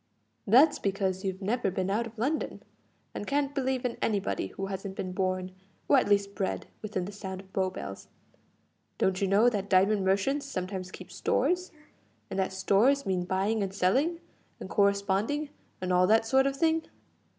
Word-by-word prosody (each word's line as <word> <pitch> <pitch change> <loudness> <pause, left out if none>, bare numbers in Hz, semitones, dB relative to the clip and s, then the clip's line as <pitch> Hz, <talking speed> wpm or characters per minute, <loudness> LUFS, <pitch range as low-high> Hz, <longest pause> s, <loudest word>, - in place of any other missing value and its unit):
"That's 275 +8 +6
because 190 -1 -1
you've 190 0 -3
never 225 +1 0
been 190 0 -2
out 230 +3 0
of 230 +1 -14
London, 275 +8 -2 0.5
and 205 - -5
can't 285 0 0
believe 265 -2 -1
in 245 - -2
anybody 205 -3 0
who 195 - -5
hasn't 195 0 -5
been 185 - -4
borne 185 0 -1 0.4
or - - +5
at 245 - -1
least 200 -1 +2
bred, 195 -2 -2 0.2
within 200 -4 -3
the 200 - -6
sound 190 -2 -6
of 190 0 -15
Bow 190 -1 +1
Bells. 100 - -8 0.9
Don't 190 0 +1
you 195 - +2
know 205 +5 +4
that 205 -4 0
diamond 195 +2 +4
merchants 200 +10 +1
sometimes 185 -5 -4
keep - - -11
stores, 360 0 0 0.6
and - - -2
that 190 - 0
stores 205 +9 +3
mean 185 -2 0
buying 195 +4 0
and 195 -1 -3
selling, 270 - +2 0.4
and - - -8
corresponding, 200 +8 +1 0.3
and 185 0 -1
all 180 0 +4
that 225 +2 +4
sort 265 +4 +3
of 275 - -1
thing? 320 +2 +2
200 Hz, 175 wpm, -29 LUFS, 190-245 Hz, 0.9 s, That's